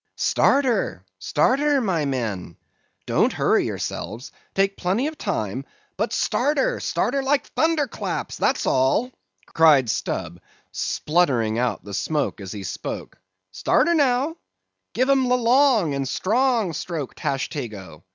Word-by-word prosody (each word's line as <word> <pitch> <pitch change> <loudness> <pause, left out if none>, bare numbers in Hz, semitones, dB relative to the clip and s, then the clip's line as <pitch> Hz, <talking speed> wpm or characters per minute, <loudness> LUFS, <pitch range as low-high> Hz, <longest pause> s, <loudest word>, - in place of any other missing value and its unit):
"Start 280 +1 +3
her, 200 - -1
start 245 - +2
her, 295 -1 +3
my 180 - 0
men! 110 - -3 0.5
Don't - - +2
hurry - - +2
yourselves; 115 +5 -5 0.2
take 195 0 +2
plenty 195 +9 0
of 310 +1 -3
time—but 140 - -4
start 290 +4 0
her; - - +1
start - - -1
her 275 - +1
like 275 +1 +1
thunder 320 -2 +2
claps, 245 - -4
that's - - +1
all," 135 - +2 0.3
cried 145 -8 +4
Stubb, - - -4 0.3
spluttering 125 -9 0
out 125 -1 -1
the 100 - -9
smoke 145 0 -1
as 95 -2 -7
he 100 -2 -6
spoke. 90 - -6 0.3
"Start 95 - +2
her, - - +4
now; 285 +1 +1 0.6
give 255 +2 +2
'em 265 -2 +3
the 250 - +4
long 240 - +3
and 135 -1 -2
strong 230 -3 +1
stroke, 155 -3 -4
Tashtego. 110 - -4
185 Hz, 140 wpm, -23 LUFS, -, 0.6 s, cried